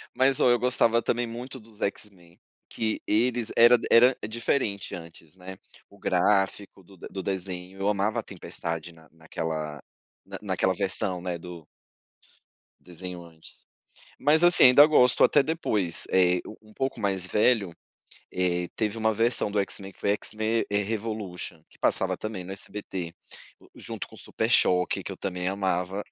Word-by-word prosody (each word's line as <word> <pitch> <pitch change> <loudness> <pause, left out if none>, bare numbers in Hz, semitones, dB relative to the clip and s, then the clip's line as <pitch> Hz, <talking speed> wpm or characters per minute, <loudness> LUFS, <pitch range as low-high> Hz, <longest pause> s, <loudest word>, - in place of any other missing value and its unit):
Mas 130 +1 +3
ó, 125 - +4
eu 120 - +4
gostava 115 -2 +2
também 120 +1 -1
muito 125 +3 -7
dos 110 -1 -17
X-Men, 90 -4 -6 0.3
que 110 -1 -2
eles 115 +1 +1
era 120 +1 +8
era 125 +3 +7
diferente 110 -3 -2
antes, 85 -1 -12
né, 95 0 -10 0.3
o - - -19
gráfico 95 -1 0
do 95 +1 -18
do 95 +2 -7
desenho, 95 0 -5
eu 100 +1 +1
amava 105 +1 0
a - - -5
Tempestade 85 +1 -6
na 80 -2 -20
naquela 80 -2 -5 0.4
na - - -7
naquela 95 - 0
versão, 95 -2 -2
né, 90 -1 -3
do 85 -2 -10 1.2
desenho 90 0 -8
antes. 80 -1 -16 0.5
Mas, 155 +3 +3
assim, 175 -4 +6
ainda 130 +4 +9
gosto 125 -5 +4
até 145 - +5
depois, 110 - 0
eh, 90 -1 +3 0.2
um 110 0 -19
pouco 135 -3 -3
mais 95 -3 0
velho, 105 -4 +2 0.6
eh, 90 -1 0
teve 110 0 -2
uma 110 0 +2
versão 115 -1 +1
do 105 - -1
X-Men 100 0 -2
que - - -27
foi 100 - +1
"X-Men", 110 +2 -1
eh, 105 - +2
"Revolution", 100 -6 -5
que - - -21
passava - - +1
também 105 -4 -6
no 95 - -7
SBT, 95 -4 -6 0.6
junto - - -7
com - - -16
o - - -13
Super - - -3
Choque, 90 0 +3
que - - -6
eu - - -9
também 90 -1 -3
amava, 95 0 -1
100 Hz, 160 wpm, -26 LUFS, 90-115 Hz, 1.2 s, ainda